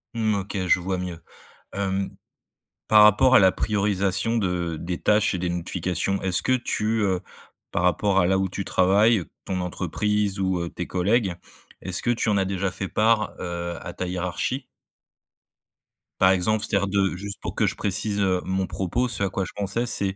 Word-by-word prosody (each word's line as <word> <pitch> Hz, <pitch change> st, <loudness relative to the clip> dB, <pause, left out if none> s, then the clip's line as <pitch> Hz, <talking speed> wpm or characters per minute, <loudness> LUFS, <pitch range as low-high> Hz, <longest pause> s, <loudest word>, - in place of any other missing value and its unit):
Mmh, 110 Hz, -2 st, +1 dB
OK, 100 Hz, +1 st, -4 dB
je 90 Hz, -, +4 dB
vois 95 Hz, +1 st, -2 dB
mieux. 90 Hz, -2 st, -5 dB, 0.5 s
Hem, 95 Hz, -1 st, -2 dB, 0.8 s
par 105 Hz, -1 st, +7 dB
rapport 130 Hz, +5 st, +6 dB
à -, -, +9 dB
la 95 Hz, -1 st, +5 dB
priorisation 100 Hz, +2 st, 0 dB
de 90 Hz, -5 st, -1 dB
des 85 Hz, 0 st, -4 dB
tâches 105 Hz, -1 st, +3 dB
et -, -, -1 dB
des 90 Hz, 0 st, -2 dB
notifications, 90 Hz, +2 st, -2 dB
est-ce 95 Hz, -1 st, +2 dB
que 130 Hz, -, +1 dB
tu, 110 Hz, -3 st, 0 dB
heu, 95 Hz, -3 st, +1 dB, 0.5 s
par 85 Hz, -, -1 dB
rapport 95 Hz, +3 st, +2 dB
à 90 Hz, -, +3 dB
là 95 Hz, 0 st, +2 dB
où 95 Hz, 0 st, 0 dB
tu 95 Hz, +2 st, -5 dB
travailles, 100 Hz, +2 st, +3 dB, 0.2 s
ton 95 Hz, -2 st, -3 dB
entreprise 100 Hz, +3 st, -1 dB
ou, 95 Hz, -2 st, 0 dB
heu, 85 Hz, -, -3 dB
tes 90 Hz, -, -6 dB
collègues, 95 Hz, +1 st, +1 dB, 0.5 s
est-ce 95 Hz, -1 st, 0 dB
que 120 Hz, -, -1 dB
tu 115 Hz, -2 st, 0 dB
en 100 Hz, -, +2 dB
as 95 Hz, -, +1 dB
déjà 95 Hz, -1 st, -2 dB
fait 95 Hz, +1 st, -4 dB
part, 110 Hz, 0 st, +1 dB
heu, 85 Hz, -1 st, -4 dB
à -, -, -6 dB
ta 90 Hz, -, -4 dB
hiérarchie? 90 Hz, +9 st, -2 dB, 1.6 s
Par 95 Hz, 0 st, +6 dB
exemple, 105 Hz, +4 st, +2 dB
c'est-à-dire 100 Hz, -2 st, 0 dB
de 95 Hz, -2 st, +1 dB
juste 100 Hz, +1 st, -7 dB
pour -, -, -6 dB
que -, -, +2 dB
je -, -, -1 dB
précise, 100 Hz, +1 st, 0 dB
heu, 95 Hz, -2 st, +1 dB
mon 95 Hz, 0 st, -1 dB
propos, 120 Hz, +7 st, -1 dB
ce 105 Hz, -4 st, -1 dB
à 95 Hz, -, +1 dB
quoi 95 Hz, 0 st, -2 dB
je -, -, -10 dB
pensais, 105 Hz, +4 st, -1 dB
c'est, 100 Hz, -4 st, -1 dB
95 Hz, 190 wpm, -24 LUFS, 90-105 Hz, 1.6 s, à